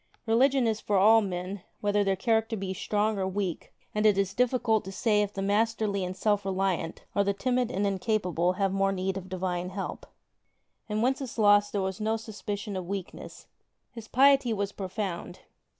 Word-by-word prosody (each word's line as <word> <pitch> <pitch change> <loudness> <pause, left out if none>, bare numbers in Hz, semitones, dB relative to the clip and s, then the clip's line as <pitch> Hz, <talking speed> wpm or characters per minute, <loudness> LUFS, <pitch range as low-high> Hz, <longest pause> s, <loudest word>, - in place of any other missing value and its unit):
Religion 255 +3 +3
is 220 -1 0
for 205 - +1
all 220 +4 +6
men, 185 0 -4 0.2
whether 205 0 +1
their 195 -1 +1
character 225 +2 0
be 190 -1 -3
strong 210 +2 0
or 190 - 0
weak, 190 -2 -3 0.2
and 210 - 0
it 210 -2 +4
is 195 -1 0
difficult 245 -3 +1
to 190 - -7
say 210 +1 +2
if 205 -1 -1
the 195 -1 -4
masterly 210 -1 +1
and 180 +1 -4
self 205 0 +1
reliant, 190 -3 -2
or 200 - +2
the 200 0 0
timid 250 +1 0
and 205 -4 -1
incapable 185 -3 0
have 195 0 0
more 195 0 +2
need 190 0 -2
of 190 -1 -7
Divine 180 -1 -2
help. 195 +1 -6 0.8
In 215 +1 0
Wenceslaus 220 -6 +3
there 200 -2 -1
was 190 +2 -3
no 220 +1 +1
sus 220 -1 -10
picion 205 0 -4
of 185 -2 -4
weakness. 195 -1 -7 0.5
His 230 -3 -10
piety 270 -2 +4
was 200 -1 -2
profound. 190 -2 -5
205 Hz, 180 wpm, -28 LUFS, 190-220 Hz, 0.8 s, all